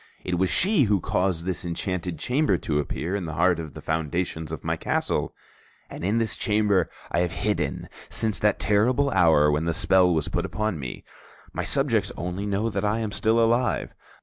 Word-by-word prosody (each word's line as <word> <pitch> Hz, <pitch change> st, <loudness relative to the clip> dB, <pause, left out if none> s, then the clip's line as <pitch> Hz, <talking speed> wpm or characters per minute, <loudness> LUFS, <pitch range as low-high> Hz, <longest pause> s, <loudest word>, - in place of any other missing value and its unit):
It 90 Hz, -1 st, -1 dB
was 95 Hz, 0 st, +2 dB
she 185 Hz, -, +3 dB
who 100 Hz, -2 st, +2 dB
caused 90 Hz, -1 st, -1 dB
this 95 Hz, -1 st, -3 dB
enchanted 90 Hz, 0 st, -3 dB
chamber 140 Hz, -, +1 dB
to 75 Hz, -2 st, -1 dB
appear 85 Hz, +5 st, -3 dB
in 100 Hz, -3 st, -3 dB
the 80 Hz, -, -5 dB
heart 90 Hz, +1 st, +3 dB
of 80 Hz, -4 st, -7 dB
the -, -, -9 dB
foundations 80 Hz, 0 st, -2 dB
of 80 Hz, -, -6 dB
my -, -, 0 dB
castle; -, -, -1 dB, 0.6 s
and -, -, -7 dB
in 100 Hz, +5 st, +1 dB
this 115 Hz, -1 st, 0 dB
chamber 105 Hz, -5 st, +1 dB, 0.2 s
I -, -, +1 dB
have 85 Hz, -1 st, 0 dB
hidden 90 Hz, -10 st, -2 dB, 0.2 s
since 110 Hz, -2 st, -1 dB
that 105 Hz, 0 st, +2 dB
terrible 125 Hz, +7 st, +2 dB
hour 80 Hz, -7 st, +4 dB
when 75 Hz, +2 st, 0 dB
the 85 Hz, -1 st, 0 dB
spell 95 Hz, -2 st, +4 dB
was 80 Hz, -3 st, 0 dB
put -, -, -1 dB
upon 110 Hz, -6 st, -2 dB
me. 65 Hz, -3 st, -6 dB, 0.5 s
My -, -, -2 dB
subjects -, -, +1 dB
only 90 Hz, +4 st, -3 dB
know 100 Hz, +2 st, 0 dB
that 100 Hz, -1 st, -2 dB
I 105 Hz, +1 st, +1 dB
am 110 Hz, -2 st, -2 dB
still 110 Hz, +2 st, +2 dB
alive. 115 Hz, 0 st, +1 dB
95 Hz, 195 wpm, -25 LUFS, 85-110 Hz, 0.6 s, hour